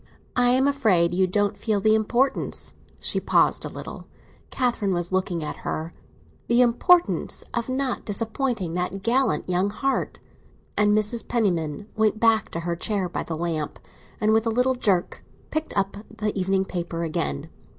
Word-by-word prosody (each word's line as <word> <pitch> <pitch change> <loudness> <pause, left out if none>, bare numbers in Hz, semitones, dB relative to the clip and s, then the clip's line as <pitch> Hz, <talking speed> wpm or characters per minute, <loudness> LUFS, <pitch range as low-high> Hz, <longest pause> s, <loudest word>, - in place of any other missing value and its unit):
"I 245 0 +4
am 260 +2 +4
afraid 215 -12 +3
you 185 +1 +3
don't 205 +2 +1
feel 215 -3 0
the 215 +2 +4
importance—" 240 +5 +1 0.3
She - - 0
paused - - +2
a - - -4
little; - - -8 0.4
Catherine 235 -7 0
was 175 0 -2
looking 185 -3 0
at 150 - -5
her. 160 +2 -4 0.5
"The 240 +1 +5
importance 345 +9 +3
of 235 +1 -2
not 260 -1 -1
disappointing 225 -3 -1
that 180 +2 -3
gallant 250 +2 +1
young 185 +2 +1
heart!" 270 +6 -1 0.6
And 210 0 +3
Mrs. 215 +2 0
Penniman 185 -6 0
went 215 0 +2
back 225 -2 +3
to 170 - -4
her 170 0 -2
chair, 195 +1 -1
by - - -3
the 165 - -4
lamp, 160 -3 -2 0.4
and, 215 0 +3
with 220 +1 +2
a - - +3
little 250 +3 +2
jerk, 200 -8 0 0.3
picked 315 -6 -3
up 195 0 0
the 215 -1 -3
evening 190 0 +1
paper 170 -2 -4
again. 75 - -3
210 Hz, 160 wpm, -24 LUFS, 180-235 Hz, 0.6 s, The